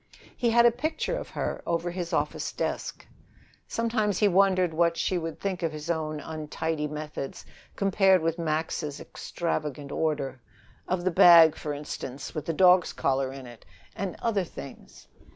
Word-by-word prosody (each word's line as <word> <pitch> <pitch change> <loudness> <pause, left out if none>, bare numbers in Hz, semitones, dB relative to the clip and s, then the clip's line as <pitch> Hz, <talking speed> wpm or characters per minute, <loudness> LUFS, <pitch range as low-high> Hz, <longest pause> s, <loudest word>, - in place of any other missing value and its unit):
He 240 - +1
had 235 +1 +5
a 240 - +7
picture 305 - -2
of - - -6
her - - -3
over 170 +1 -1
his 175 -1 -4
office - - -1
desk. - - -4 0.6
Sometimes 220 -4 0
he 210 - +4
wondered 185 -2 +3
what 170 +1 +2
she 185 - 0
would 165 -1 -5
think 190 -2 -3
of 165 -2 0
his 155 +2 -4
own 155 -2 -2
untidy 155 0 -3
methods 150 -2 -6 0.3
compared 195 -2 +3
with 165 +1 -1
Max's 155 -2 -2
extravagant 150 -4 -4
order 140 -6 -2 0.5
of 185 -1 -1
the 185 - +1
bag, 165 -2 +8
for 150 - -5
instance, 145 -2 -6
with 155 - -5
the - - +1
dog's 180 0 +5
collar 135 -1 0
in 135 -1 -9
it, 120 -2 -13 0.3
and 195 -2 -4
other 210 -5 +1
things. 70 - -11
165 Hz, 160 wpm, -27 LUFS, 150-185 Hz, 0.6 s, bag